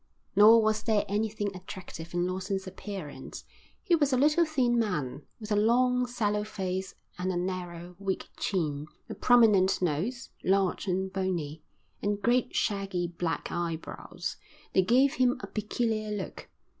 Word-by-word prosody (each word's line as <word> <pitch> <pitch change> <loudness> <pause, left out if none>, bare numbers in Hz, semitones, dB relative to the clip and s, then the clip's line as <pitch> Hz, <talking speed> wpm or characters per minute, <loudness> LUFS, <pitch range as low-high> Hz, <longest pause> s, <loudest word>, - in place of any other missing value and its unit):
Nor 220 +2 +8
was 215 0 +2
there 220 -2 +1
anything 205 -1 -1
attractive 180 -2 -8
in 175 0 +2
Lawson's 190 +2 -2
appearance. 190 -4 -7 0.4
He 370 - +1
was 290 -4 +2
a 255 - +3
little 300 +5 +4
thin 250 -6 +2
man, 150 - -2
with 215 -1 -8
a - - +4
long, 250 +4 +3
sallow 210 -4 0
face 190 -3 -4 0.2
and 185 +1 0
a 180 - -1
narrow, 175 -1 -4
weak 195 -1 -2
chin, 150 -6 -1 0.2
a - - -2
prominent 210 -6 +5
nose, 185 - -2
large 195 +1 +1
and 190 +1 -1
bony, 170 -6 -2 0.4
and 205 0 0
great 240 +4 +1
shaggy 195 -4 0
black 170 -2 -3
eyebrows. 170 -2 -4 0.4
They 190 - +5
gave 255 +8 +4
him 255 -3 +2
a - - -6
peculiar 215 0 -2
look. 205 -3 -5
200 Hz, 145 wpm, -29 LUFS, 180-225 Hz, 0.4 s, Nor